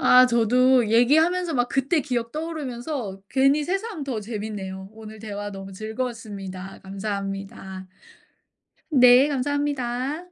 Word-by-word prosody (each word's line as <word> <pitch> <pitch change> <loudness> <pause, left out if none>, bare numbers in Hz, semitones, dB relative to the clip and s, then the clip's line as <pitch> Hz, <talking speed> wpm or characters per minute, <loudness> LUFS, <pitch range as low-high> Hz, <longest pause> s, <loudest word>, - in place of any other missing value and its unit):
아 255 0 +7
저도 250 +1 +4
얘기하면서 320 +9 +3
막 245 -1 +1
그때 275 +5 +1
기억 240 -5 -3
떠오르면서 275 -9 -4
괜히 275 +3 +3
새삼 390 +1 -3
더 260 -6 -3
재밌네요 205 -3 -6
오늘 220 0 -11
대화 205 -1 -5
너무 195 0 -8
즐거웠습니다 210 -4 -6
감사합니다. 195 -1 -5 1.0
네, 255 0 +7
감사합니다. 280 -1 -1
240 Hz, 290 characters per minute, -24 LUFS, 205-275 Hz, 1.0 s, 아